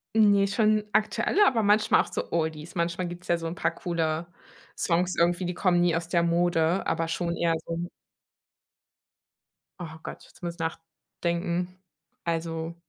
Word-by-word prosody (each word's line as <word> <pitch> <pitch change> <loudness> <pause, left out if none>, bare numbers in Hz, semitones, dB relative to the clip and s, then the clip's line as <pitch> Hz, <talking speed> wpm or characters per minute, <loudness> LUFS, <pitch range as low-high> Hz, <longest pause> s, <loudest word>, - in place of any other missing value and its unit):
Ne, 205 -2 +5
schon 215 +1 +2
aktuelle, 340 - +3
aber 230 -4 +3
manchmal 210 +1 +4
auch - - -10
so - - -4
Oldies. 160 -1 -2
Manchmal 170 +1 -1
gibt 175 +1 -9
es - - -14
ja 175 - +3
so 165 -1 -5
'n 165 - -3
paar - - 0
coole 165 -1 -2 0.5
Songs 180 +1 +1
irgendwie, 175 +2 +2
die 180 - -1
kommen 180 -1 +2
nie 175 -1 +3
aus 165 0 -2
der 170 -1 +2
Mode, 170 +1 +2
aber 165 0 0
schon 170 0 -2
eher 170 -1 +2
so 170 +1 -3 1.9
Oh 175 - -4 0.2
Gott, - - -8
jetzt - - -20
muss 170 -1 -3
ich - - -22
nachdenken. 170 +2 -3 0.5
Also. 165 0 -2
170 Hz, 165 wpm, -27 LUFS, 165-185 Hz, 1.9 s, Ne